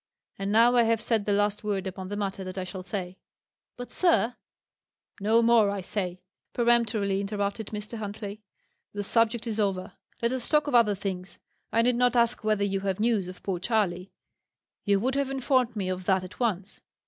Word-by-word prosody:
And 195 +1 -2
now 230 +3 +5
I - - +7
have 225 0 +2
said 220 -2 0
the 205 - 0
last 205 +1 +1
word 200 -2 -1
upon 190 0 -5
the 205 - -4
matter 195 -2 -3
that 185 0 -7
I 185 - -1
shall 185 +1 -7
say." 180 0 -5 0.6
"But, 245 0 -7
sir 325 -9 +2 0.4
" - - -32
"No 225 +3 +4
more, 230 -3 +5
I 200 -1 -2
say!" 180 -1 -4 0.3
peremptorily 230 -5 +2
interrupted 200 +1 -3
Mr. 215 +2 -6
Huntley. 205 0 -6 0.5
"The 205 0 -3
subject 230 +2 +1
is 220 -2 -3
over. 195 -3 -1 0.3
Let 235 0 0
us 255 -2 -3
talk 300 -1 +3
of 290 - -3
other 230 -4 +5
things. 190 -1 -5 0.3
I 230 - +3
need 245 0 +2
not 250 0 +3
ask 235 -1 +2
whether 215 -1 +1
you 195 -1 0
have 195 -1 -2
news 220 -4 +1
of 185 0 -10
poor 190 -3 -2
Charley; 190 -3 0 0.7
you 200 -1 +3
would 255 +6 0
have 280 0 0
informed 260 -3 +1
me 195 -3 -2
of 185 0 -3
that 190 -1 +2
at 185 - -11
once. 210 -4 -2
210 Hz, 195 wpm, -27 LUFS, 195-235 Hz, 0.7 s, I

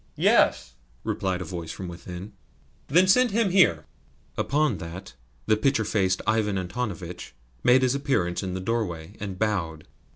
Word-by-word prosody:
"Yes," - - +3 0.3
replied 95 -1 -2
a - - -9
voice 85 -3 -6
from 95 - -7
within. 90 +3 -8 0.5
"Then 180 +6 +4
send 250 +6 +5
him 215 -2 +1
here." 190 -1 +4 0.5
Upon 145 - +1
that 85 -2 -8 0.3
the 110 - +4
pitcher 115 0 +1
faced 95 -3 0
Ivan 110 -2 +1
Antonovitch 90 - -5 0.3
made 130 +1 +5
his 130 0 +3
appearance 135 -12 0
in 95 -2 -4
the 95 - -4
doorway, 95 -6 -3
and 100 -3 -5
bowed. 90 -7 -2
100 Hz, 150 wpm, -26 LUFS, 90-125 Hz, 0.5 s, send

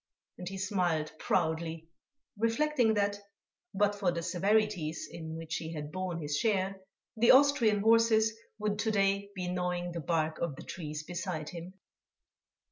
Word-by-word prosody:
And 180 0 -5
he 195 - -6
smiled 180 -5 0
proudly, 160 -1 -1 0.5
reflecting 230 +1 +2
that, 205 0 +1 0.5
but 205 +1 +2
for 200 -3 0
the 170 -1 -3
severities 195 -4 0
in 160 -1 -7
which 165 0 -4
he 160 0 -5
had 150 -1 -5
borne 185 -1 -3
his 145 -2 -1
share, 195 -3 0 0.3
the 230 +1 +3
Austrian 260 -6 +6
horses 225 0 +4 0.2
would 210 -1 -1
to 220 - +1
day 200 -1 +1
be 180 -1 -3
gnawing 180 0 -2
the 170 - -4
bark 160 +1 0
of 170 -5 -2
the - - -10
trees 155 -3 -6
beside 175 -2 -4
him. 175 +3 -8
185 Hz, 150 wpm, -31 LUFS, 165-210 Hz, 0.5 s, Austrian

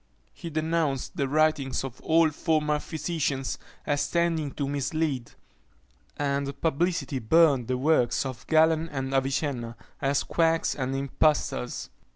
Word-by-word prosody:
He 170 - -7
denounced 155 -3 -1
the 140 - 0
writings 150 -2 +1
of 130 -2 -7
all 160 0 +3
former 150 -1 +1
physicians 150 -4 -2 0.3
as 145 -1 0
tending 170 -3 +1
to 140 - -2
mislead; 140 -2 -1 0.9
and 140 -1 -2
publicly 165 -2 0
burned 135 0 +4
the 130 - 0
works 140 -2 +2
of 130 -6 -7
Galen 160 +1 +3
and 135 -2 -4
Avicenna, 135 -3 -1 0.3
as 140 0 +1
quacks 165 -1 +1
and 135 -1 -3
impostors. 140 -2 0
145 Hz, 125 wpm, -27 LUFS, 135-160 Hz, 0.9 s, burned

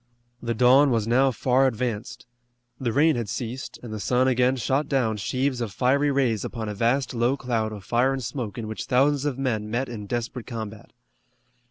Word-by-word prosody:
The 115 -1 -2
dawn 130 +5 +6
was 115 -4 +1
now 130 +3 +4
far 130 +2 +2
advanced. 115 -3 -3 0.5
The 120 -3 -1
rain 150 +4 +4
had 115 -4 -3
ceased, 120 +3 -5
and 115 -3 -7
the 110 - -4
sun 125 +4 +2
again 125 0 +3
shot 135 +4 0
down 120 -6 +1
sheaves 130 +4 -1
of 115 -4 -3
fiery 135 +6 +2
rays 130 -7 +1
upon 115 -3 -5
a 105 - -3
vast 120 +6 0
low 120 +3 +1
cloud 115 -5 -1
of 105 -2 -8
fire 120 +7 +2
and 135 -1 -3
smoke 120 -2 -4
in 115 -2 -4
which 110 - -5
thousands 140 +2 +2
of 140 -3 -1
men 110 -6 -1
met 120 +4 -1
in 105 -4 -7
desperate 120 +1 -4
combat. 110 -3 -7
125 Hz, 195 wpm, -25 LUFS, 110-130 Hz, 0.5 s, dawn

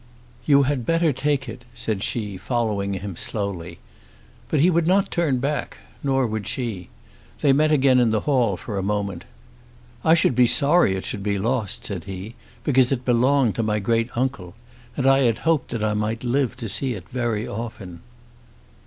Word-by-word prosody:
"You 140 -2 +6
had 135 -2 -1
better 165 +3 +2
take 140 +1 -1
it," 120 +2 -8
said 110 -4 -2
she, 105 -2 -2
following 100 -1 -1
him 95 -1 -6
slowly. 90 -4 -4 0.7
But 155 - +1
he 175 +6 +5
would 170 -1 +1
not 195 +2 +2
turn 160 -7 +1
back; 140 +2 -2 0.2
nor 135 -2 +1
would 110 -3 -3
she. 110 -6 -4 0.5
They 140 - +4
met 155 +2 +3
again 135 -3 +4
in 120 -2 +3
the 110 -1 +1
hall 125 -10 +1
for 100 0 -5
a - - -1
moment. 100 -3 -2 0.8
"I 160 - +5
should 160 - +3
be 125 0 +4
sorry 145 - +4
it 95 - -4
should 100 - -3
be 100 0 -1
lost," 115 0 -2
said - - -4
he, 95 +3 -7 0.3
"because 130 -3 +3
it 125 -2 -1
belonged 125 -1 +3
to - - +1
my 105 -1 0
great 115 +3 0
uncle. 120 -8 -2 0.4
And 135 - -1
I 135 0 +5
had 120 -4 +2
hoped 160 -5 0
that 115 -3 -3
I 105 -1 +1
might 105 +2 -2
live 125 0 0
to 120 -3 -5
see 125 +5 -1
it 90 -3 -10
very 120 -4 -2
often." 100 -6 -7
120 Hz, 185 wpm, -23 LUFS, 105-135 Hz, 0.8 s, You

